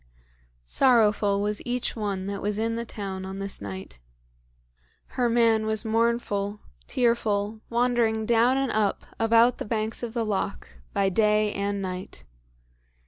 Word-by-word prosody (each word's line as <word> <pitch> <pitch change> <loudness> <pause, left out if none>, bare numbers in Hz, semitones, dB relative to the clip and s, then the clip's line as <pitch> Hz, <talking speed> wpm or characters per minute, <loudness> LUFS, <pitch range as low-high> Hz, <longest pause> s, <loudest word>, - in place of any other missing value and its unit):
Sorrowful 210 - +3
was 210 0 -1
each 245 0 -2
one 200 -4 -3
that 200 0 -4
was 205 +1 -1
in 225 +1 -1
the 235 0 -3
town 195 -4 -5
on 190 +1 -6
this 195 - -3
night. 95 -11 -7 1.1
Her 245 -2 0
man 230 -2 +3
was 220 +1 0
mournful, 220 -3 0 0.3
tearful, 220 -3 0
wandering 235 -2 +1
down 235 +3 +3
and 270 -2 0
up 210 -2 0
about 230 +2 +4
the - - -2
banks 220 0 -2
of 240 -1 -5
the 230 -1 0
loch, 205 -3 -2 0.2
by 195 - +1
day 210 +1 +2
and 200 0 -2
night. 185 0 -6
215 Hz, 140 wpm, -26 LUFS, 200-235 Hz, 1.1 s, about